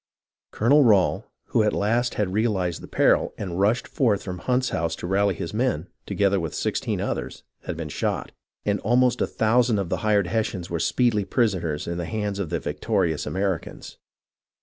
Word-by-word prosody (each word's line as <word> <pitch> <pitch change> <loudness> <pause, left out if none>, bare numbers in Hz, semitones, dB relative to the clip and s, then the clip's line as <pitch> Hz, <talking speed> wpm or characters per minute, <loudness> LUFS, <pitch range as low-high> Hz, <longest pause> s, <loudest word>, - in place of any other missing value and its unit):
Colonel 140 +7 +4
Rail, 105 -7 +3 0.2
who - - +3
at 105 -1 +2
last 115 +4 +1
had 100 -3 -1
realized 95 -6 0
the - - -9
peril, - - +2
and 90 -3 -4
rushed 105 +5 +2
forth 110 -7 +1
from 90 -2 -5
Hunt's 125 0 0
house 85 0 -1
to - - -7
rally 100 +1 +2
his 85 0 -5
men, 110 -7 -1 0.2
together 100 -1 +2
with 80 -3 -4
sixteen - - -1
others, - - -4 0.2
had 85 - -4
been 80 -2 -5
shot; - - -2 0.3
and 105 0 +1
almost 125 +3 +2
a - - +2
thousand 115 0 +2
of 95 -4 -2
the - - 0
hired 105 -2 +2
Hessians 95 -4 -2
were 85 - -1
speedily 115 +2 +2
prisoners 95 -8 0
in 85 0 -3
the 85 - -2
hands 105 -1 -3
of 95 -6 -2
the - - -1
victorious 80 -3 -1
Americans. 95 +3 -3
100 Hz, 180 wpm, -24 LUFS, 90-115 Hz, 0.3 s, Colonel